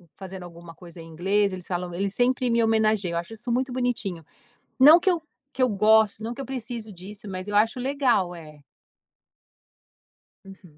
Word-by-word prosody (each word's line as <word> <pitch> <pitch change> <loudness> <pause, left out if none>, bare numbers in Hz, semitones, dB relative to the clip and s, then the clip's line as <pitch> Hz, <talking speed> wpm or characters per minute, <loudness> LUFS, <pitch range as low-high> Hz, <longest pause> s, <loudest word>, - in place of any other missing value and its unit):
fazendo, 190 -1 -9
alguma 170 -1 -12
coisa 170 -1 -12
em 165 - -11
inglês 195 +5 +1
eles 180 -1 -7
falam, 180 -1 -3
eles 195 +2 -2
sempre 250 0 +1
me 230 0 +3
homenageiam, 215 -5 +1
eu - - +1
acho 170 +6 -8
isso 225 +2 -5
muito 255 +1 -1
bonitinho. 235 -9 -2 0.6
Não 305 +6 +9
que 375 - +2
eu 340 -3 -1 0.3
que 260 - -1
eu 255 - +4
goste, 215 0 +3
não 230 +2 -4
que 245 - -9
eu - - -8
precise 235 -4 -6
disso 200 +3 -11
mas 185 +1 -6
eu 205 - -1
acho 225 +4 +2
legal 255 -9 +1
é. 155 -3 -12 1.9
Uhum. 185 -5 -15
210 Hz, 185 wpm, -25 LUFS, 180-245 Hz, 1.9 s, Não